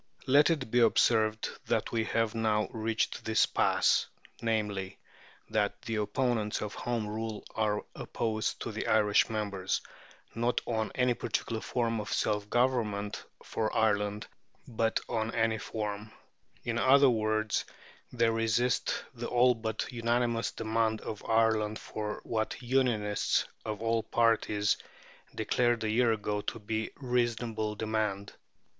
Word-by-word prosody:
Let 145 Hz, +4 st, +5 dB
it 145 Hz, -9 st, -1 dB
be 125 Hz, -, +4 dB
observed 110 Hz, -2 st, +3 dB, 0.2 s
that -, -, 0 dB
we 115 Hz, -1 st, 0 dB
have 115 Hz, -1 st, 0 dB
now 110 Hz, -2 st, +1 dB
reached 110 Hz, 0 st, -1 dB
this 110 Hz, 0 st, +3 dB
pass, -, -, +2 dB, 0.3 s
namely, 105 Hz, -4 st, -1 dB, 0.5 s
that -, -, 0 dB
the 115 Hz, -1 st, -2 dB
opponents 105 Hz, 0 st, 0 dB
of 105 Hz, -, -5 dB
Home 120 Hz, -3 st, -2 dB
Rule 110 Hz, 0 st, -4 dB
are 105 Hz, -2 st, 0 dB
opposed 110 Hz, -2 st, -2 dB
to 115 Hz, -, -3 dB
the 110 Hz, -, -4 dB
Irish 105 Hz, -1 st, +4 dB
members, 100 Hz, -4 st, -1 dB, 0.5 s
not 120 Hz, +2 st, +1 dB
on 110 Hz, -2 st, -1 dB
any 125 Hz, -1 st, +3 dB
particular 115 Hz, -1 st, -2 dB
form 115 Hz, -3 st, -1 dB
of 105 Hz, -, -7 dB
self 105 Hz, -1 st, 0 dB
government 110 Hz, -5 st, 0 dB, 0.2 s
for 110 Hz, -1 st, -2 dB
Ireland, 105 Hz, -1 st, +1 dB, 0.4 s
but 115 Hz, -1 st, 0 dB
on 115 Hz, -1 st, -2 dB
any 115 Hz, -1 st, +1 dB
form; 105 Hz, 0 st, -4 dB, 0.5 s
in 120 Hz, 0 st, -1 dB
other 135 Hz, +1 st, +6 dB
words, 110 Hz, -1 st, 0 dB, 0.5 s
they 115 Hz, -2 st, +2 dB
resist 115 Hz, +2 st, +1 dB
the 120 Hz, -1 st, -5 dB
all 125 Hz, +1 st, +4 dB
but 110 Hz, -2 st, -3 dB
unanimous 120 Hz, -1 st, 0 dB
demand 110 Hz, 0 st, 0 dB
of 105 Hz, -, -6 dB
Ireland 110 Hz, -1 st, +2 dB
for 105 Hz, -1 st, -5 dB
what 110 Hz, -1 st, -2 dB
"Unionists" 120 Hz, -5 st, +1 dB, 0.2 s
of 110 Hz, 0 st, -4 dB
all 115 Hz, 0 st, +2 dB
parties 110 Hz, -2 st, +2 dB, 0.6 s
declared 120 Hz, -2 st, +1 dB
a 110 Hz, -, 0 dB
year 120 Hz, +1 st, +3 dB
ago 105 Hz, -1 st, -1 dB
to 115 Hz, -, -4 dB
be 110 Hz, +1 st, -2 dB
a -, -, -13 dB
reasonable 120 Hz, -4 st, -1 dB
demand. 105 Hz, -2 st, -2 dB
110 Hz, 135 wpm, -30 LUFS, 105-120 Hz, 0.6 s, other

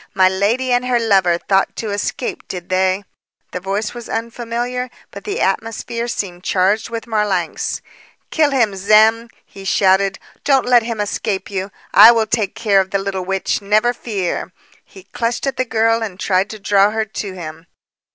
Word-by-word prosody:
My 190 Hz, -1 st, +5 dB
lady 210 Hz, +7 st, 0 dB
and 245 Hz, 0 st, +2 dB
her 250 Hz, -1 st, +2 dB
lover 190 Hz, -6 st, +3 dB
thought 195 Hz, +2 st, 0 dB
to 220 Hz, -2 st, -4 dB
escape, 205 Hz, +4 st, -3 dB
did 180 Hz, -2 st, -7 dB
they!" 185 Hz, +1 st, +1 dB, 0.5 s
The 180 Hz, -, -4 dB
voice 195 Hz, +4 st, -3 dB
was 240 Hz, -1 st, -9 dB
unfamiliar, 240 Hz, +2 st, -3 dB, 0.2 s
but -, -, -10 dB
the 420 Hz, +2 st, -3 dB
atmosphere 230 Hz, +1 st, -2 dB
seemed 180 Hz, -6 st, -4 dB
charged 195 Hz, +4 st, +1 dB
with 230 Hz, 0 st, -5 dB
Marlanx. 210 Hz, -7 st, -1 dB, 0.5 s
"Kill 310 Hz, -2 st, +3 dB
him, 235 Hz, -8 st, +1 dB
Zem!" 215 Hz, +4 st, +4 dB, 0.2 s
he 195 Hz, -, -12 dB
shouted. 195 Hz, 0 st, +2 dB, 0.3 s
"Don't 270 Hz, -3 st, +3 dB
let 245 Hz, -1 st, +5 dB
him 230 Hz, -1 st, -4 dB
escape 205 Hz, -1 st, -2 dB
you! 190 Hz, 0 st, -3 dB, 0.2 s
I 230 Hz, -, +10 dB
will 225 Hz, -2 st, +2 dB
take 220 Hz, -3 st, -1 dB
care 205 Hz, -4 st, +3 dB
of 190 Hz, -, -5 dB
the 195 Hz, -, 0 dB
little 195 Hz, -1 st, -3 dB
witch, 195 Hz, +2 st, -1 dB
never 215 Hz, +4 st, +2 dB
fear!" 200 Hz, -8 st, -3 dB, 0.3 s
He 190 Hz, -, -15 dB
clutched 230 Hz, +6 st, -3 dB
at 275 Hz, -, -2 dB
the 255 Hz, -, 0 dB
girl 225 Hz, 0 st, +1 dB
and 200 Hz, -4 st, -5 dB
tried 190 Hz, 0 st, +1 dB
to 215 Hz, -, -7 dB
draw 200 Hz, 0 st, +3 dB
her 220 Hz, 0 st, -1 dB
to 200 Hz, -2 st, -6 dB
him. 165 Hz, -2 st, -9 dB
210 Hz, 175 wpm, -18 LUFS, 190-230 Hz, 0.5 s, I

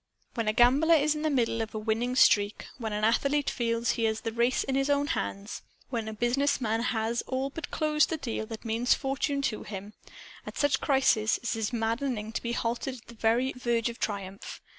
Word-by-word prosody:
When 230 Hz, -3 st, -2 dB
a 215 Hz, -, +2 dB
gambler 270 Hz, +8 st, +5 dB
is 305 Hz, 0 st, +3 dB
in 300 Hz, -, -4 dB
the 310 Hz, -, +1 dB
middle 235 Hz, -5 st, +1 dB
of 225 Hz, 0 st, -5 dB
a -, -, -1 dB
winning 225 Hz, +3 st, -1 dB
streak, 205 Hz, -4 st, +4 dB
when 220 Hz, -2 st, -3 dB
an 210 Hz, 0 st, -2 dB
athlete 280 Hz, +6 st, +2 dB
feels 230 Hz, 0 st, 0 dB
he 230 Hz, -, 0 dB
has 220 Hz, 0 st, 0 dB
the 225 Hz, -, -3 dB
race 235 Hz, +3 st, +1 dB
in 270 Hz, -, -2 dB
his 270 Hz, +1 st, +1 dB
own 285 Hz, 0 st, +2 dB
hands, 205 Hz, -9 st, -3 dB, 0.3 s
when 230 Hz, -3 st, -2 dB
a 220 Hz, -, -4 dB
business 245 Hz, +6 st, +1 dB
man 225 Hz, -2 st, 0 dB
has 230 Hz, -1 st, 0 dB
all 265 Hz, +1 st, -2 dB
but 310 Hz, +1 st, -6 dB
closed 305 Hz, -1 st, +2 dB
the 320 Hz, -, -1 dB
deal 225 Hz, -6 st, -4 dB
that 225 Hz, +1 st, -8 dB
means 230 Hz, +2 st, +2 dB
fortune 280 Hz, +1 st, -1 dB
to 230 Hz, -5 st, -1 dB
him 205 Hz, 0 st, -7 dB, 0.5 s
at -, -, -9 dB
such 285 Hz, -1 st, +2 dB
crises 220 Hz, -6 st, +3 dB
it 240 Hz, -, -1 dB
is 225 Hz, 0 st, -2 dB
maddening 230 Hz, -1 st, -2 dB
to -, -, -3 dB
be 235 Hz, 0 st, -3 dB
halted 240 Hz, +3 st, -2 dB
at 240 Hz, -, -15 dB
the -, -, -10 dB
very 235 Hz, +4 st, +1 dB
verge 240 Hz, -2 st, 0 dB
of 235 Hz, -, -9 dB
triumph. 195 Hz, -2 st, -4 dB
235 Hz, 215 wpm, -28 LUFS, 220-270 Hz, 0.5 s, gambler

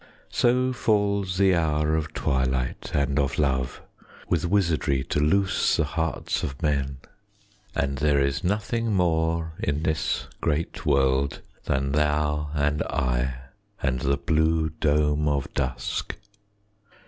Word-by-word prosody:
So 125 Hz, +1 st, +2 dB
falls 100 Hz, -5 st, +1 dB
the 95 Hz, -1 st, +4 dB
hour 75 Hz, -2 st, +1 dB
of 80 Hz, -1 st, -2 dB
twilight 65 Hz, -1 st, -1 dB
and 70 Hz, 0 st, +1 dB
of 70 Hz, -2 st, 0 dB
love 65 Hz, -4 st, 0 dB, 0.4 s
With 85 Hz, -1 st, 0 dB
wizardry 80 Hz, -8 st, +1 dB
to 75 Hz, -, -1 dB
loose 95 Hz, +6 st, +2 dB
the -, -, +3 dB
hearts 80 Hz, -1 st, -2 dB
of 65 Hz, -, -4 dB
men, 70 Hz, -3 st, 0 dB, 0.8 s
And 70 Hz, -1 st, -1 dB
there 75 Hz, -1 st, +3 dB
is 70 Hz, 0 st, 0 dB
nothing 105 Hz, +4 st, 0 dB
more 80 Hz, -2 st, +1 dB
in 75 Hz, +2 st, -1 dB
this 80 Hz, -1 st, 0 dB, 0.2 s
great 80 Hz, +1 st, -2 dB
world 70 Hz, -1 st, +2 dB, 0.2 s
Than 70 Hz, +1 st, 0 dB
thou 75 Hz, 0 st, +1 dB
and 75 Hz, +1 st, +1 dB
I, 65 Hz, 0 st, -1 dB, 0.4 s
and 65 Hz, -2 st, +1 dB
the 70 Hz, +1 st, +1 dB
blue 80 Hz, +1 st, +1 dB
dome 75 Hz, -1 st, +1 dB
of 70 Hz, -3 st, -1 dB
dusk. 65 Hz, -3 st, -2 dB
75 Hz, 125 wpm, -25 LUFS, 70-80 Hz, 0.8 s, the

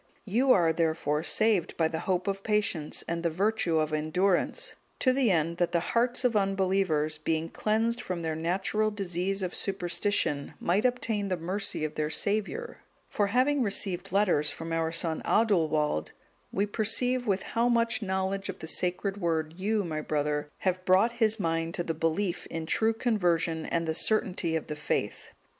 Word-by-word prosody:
'(203) 200 Hz, -, -10 dB
You 260 Hz, +2 st, +4 dB
are, 170 Hz, -7 st, +4 dB
therefore, 160 Hz, -2 st, 0 dB
saved 210 Hz, -2 st, +2 dB
by 160 Hz, -, +3 dB
the 160 Hz, 0 st, -4 dB
hope 185 Hz, +1 st, +1 dB
of 195 Hz, 0 st, -1 dB
patience, 200 Hz, -8 st, -1 dB
and 170 Hz, 0 st, -2 dB
the 170 Hz, -, +1 dB
virtue 190 Hz, -1 st, +1 dB
of 155 Hz, 0 st, 0 dB
endurance, 180 Hz, -, 0 dB, 0.2 s
to 255 Hz, -, +3 dB
the 260 Hz, -3 st, +2 dB
end 170 Hz, -2 st, +1 dB
that 175 Hz, -1 st, 0 dB
the 170 Hz, -, +3 dB
hearts 240 Hz, +2 st, +2 dB
of 245 Hz, -3 st, +2 dB
unbelievers, 190 Hz, -6 st, +1 dB
being 160 Hz, +1 st, -1 dB
cleansed 225 Hz, +5 st, 0 dB
from 180 Hz, -6 st, -4 dB
their 160 Hz, -1 st, -1 dB
natural 190 Hz, +6 st, 0 dB
disease 195 Hz, -1 st, -2 dB
of 180 Hz, -, -3 dB
superstition, 175 Hz, -5 st, 0 dB
might 195 Hz, +7 st, +1 dB
obtain 225 Hz, -5 st, 0 dB
the 185 Hz, -2 st, -1 dB
mercy 190 Hz, +1 st, -3 dB
of 155 Hz, -, -4 dB
their 150 Hz, 0 st, -1 dB
Saviour: 215 Hz, -, -2 dB, 0.3 s
for 205 Hz, -, +1 dB
having 260 Hz, +6 st, +2 dB
received 195 Hz, -4 st, -1 dB
letters 180 Hz, -7 st, +2 dB
from 165 Hz, +3 st, -5 dB
our 165 Hz, 0 st, 0 dB
son 165 Hz, -1 st, 0 dB
Adulwald,(204) 155 Hz, -, +2 dB, 0.4 s
we 200 Hz, -, +1 dB
perceive 245 Hz, +4 st, 0 dB
with 190 Hz, -2 st, +1 dB
how 235 Hz, +1 st, 0 dB
much 235 Hz, -1 st, +2 dB
knowledge 190 Hz, 0 st, -2 dB
of 190 Hz, -, -4 dB
the 160 Hz, -, -8 dB
Sacred 180 Hz, +4 st, -1 dB
Word 160 Hz, -4 st, -1 dB
you, 210 Hz, +2 st, 0 dB
my 155 Hz, -3 st, -3 dB
brother, 150 Hz, -1 st, -1 dB
have 185 Hz, -1 st, 0 dB
brought 190 Hz, +6 st, +4 dB
his 220 Hz, 0 st, +3 dB
mind 165 Hz, -1 st, -1 dB
to 175 Hz, -, -1 dB
the 165 Hz, -, -2 dB
belief 165 Hz, +4 st, -1 dB
in 165 Hz, -1 st, -5 dB
true 220 Hz, +7 st, +2 dB
conversion 175 Hz, -8 st, 0 dB
and 165 Hz, -1 st, -1 dB
the 160 Hz, -, 0 dB
certainty 180 Hz, -3 st, +1 dB
of 160 Hz, -, -2 dB
the 150 Hz, -, -5 dB
faith. 150 Hz, 0 st, -3 dB
185 Hz, 175 wpm, -28 LUFS, 165-210 Hz, 0.4 s, You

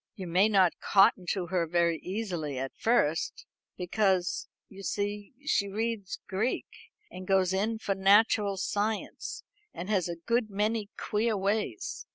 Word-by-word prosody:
You 190 Hz, -, -6 dB
may 185 Hz, +5 st, +3 dB
not 190 Hz, -4 st, +3 dB
cotton 195 Hz, -2 st, +4 dB
to 190 Hz, -3 st, -2 dB
her 175 Hz, -1 st, 0 dB
very 170 Hz, 0 st, +2 dB
easily 180 Hz, -8 st, -4 dB
at 135 Hz, +1 st, -3 dB
first, 165 Hz, -9 st, +1 dB, 0.3 s
because, 185 Hz, -1 st, 0 dB, 0.2 s
you 195 Hz, 0 st, -12 dB
see, 205 Hz, +3 st, -3 dB
she 200 Hz, -9 st, +2 dB
reads 215 Hz, -1 st, -3 dB
Greek, 210 Hz, +6 st, -1 dB, 0.5 s
and 185 Hz, 0 st, -8 dB
goes 190 Hz, -1 st, +3 dB
in 215 Hz, +4 st, 0 dB
for 205 Hz, -2 st, -1 dB
natural 200 Hz, +1 st, +4 dB
science, 210 Hz, +3 st, -2 dB, 0.3 s
and 185 Hz, +4 st, -5 dB
has 185 Hz, -4 st, +1 dB
a 170 Hz, -, -3 dB
good 230 Hz, +6 st, 0 dB
many 210 Hz, +1 st, -1 dB
queer 215 Hz, +1 st, 0 dB
ways. 210 Hz, -, -2 dB
195 Hz, 145 wpm, -29 LUFS, 180-215 Hz, 0.5 s, cotton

